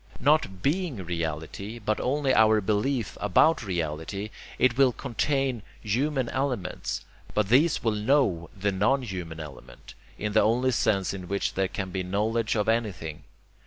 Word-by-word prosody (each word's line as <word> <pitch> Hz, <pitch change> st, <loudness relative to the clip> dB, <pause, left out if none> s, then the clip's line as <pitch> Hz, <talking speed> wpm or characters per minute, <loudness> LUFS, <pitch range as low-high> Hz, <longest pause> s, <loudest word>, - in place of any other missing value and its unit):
Not 140 Hz, -, +2 dB
BEING 145 Hz, -, 0 dB
reality, 85 Hz, +6 st, -4 dB
but 110 Hz, -1 st, -1 dB
only 135 Hz, +1 st, +1 dB
our 110 Hz, -1 st, +5 dB
belief 110 Hz, +4 st, -1 dB
ABOUT 130 Hz, -, +4 dB
reality, 85 Hz, +2 st, -3 dB, 0.3 s
it 130 Hz, -2 st, +3 dB
will 135 Hz, -1 st, +5 dB
contain 135 Hz, 0 st, -1 dB, 0.2 s
human 130 Hz, +4 st, 0 dB
elements, 125 Hz, -9 st, -2 dB, 0.3 s
but 105 Hz, -2 st, +1 dB
these 145 Hz, +7 st, +4 dB
will 115 Hz, -, +2 dB
KNOW 105 Hz, -, +1 dB
the 100 Hz, +1 st, 0 dB
non 125 Hz, +8 st, +2 dB
human 90 Hz, -7 st, -6 dB
element, 75 Hz, -4 st, -11 dB, 0.2 s
in 105 Hz, 0 st, -3 dB
the 110 Hz, -, +5 dB
only 120 Hz, +5 st, +2 dB
sense 100 Hz, -5 st, +1 dB
in 95 Hz, -2 st, -7 dB
which 100 Hz, +1 st, -1 dB
there 95 Hz, 0 st, +1 dB
can 95 Hz, 0 st, -5 dB
be 95 Hz, -, -2 dB
knowledge 105 Hz, +5 st, 0 dB
of 105 Hz, -2 st, 0 dB
anything. 95 Hz, -9 st, -1 dB
105 Hz, 150 wpm, -27 LUFS, 95-130 Hz, 0.3 s, our